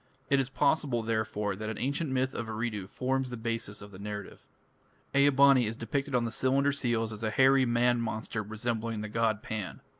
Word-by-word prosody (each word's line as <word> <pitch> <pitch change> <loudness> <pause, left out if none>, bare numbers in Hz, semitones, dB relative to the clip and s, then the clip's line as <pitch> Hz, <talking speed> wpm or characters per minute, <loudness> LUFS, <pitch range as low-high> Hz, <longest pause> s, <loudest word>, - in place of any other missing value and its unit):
It 140 - +5
is 135 -1 0
possible, 130 -2 +1
therefore, 110 -2 -1
that 110 +2 -5
an 110 - -4
ancient 140 +4 -1
myth 130 0 0
of 115 - -4
Eridu 110 -3 -3
forms 130 +4 -1
the 125 - -5
basis 115 -2 -3
of 105 - -11
the 95 - -11
narrative. 100 -1 -7 0.7
Ea 140 +1 +5
bani 135 -3 +5
is 110 - -3
depicted 135 +4 -2
on 120 -1 +2
the 115 - -3
cylinder 135 +4 +2
seals 115 -5 -1
as 105 +1 -7
a 110 - +1
hairy 130 +2 +4
man 120 0 +2
monster 110 -1 -3
resembling 110 +1 -3
the 105 - -5
god 110 -1 0
Pan. 105 -4 -5
115 Hz, 200 wpm, -30 LUFS, 110-130 Hz, 0.7 s, It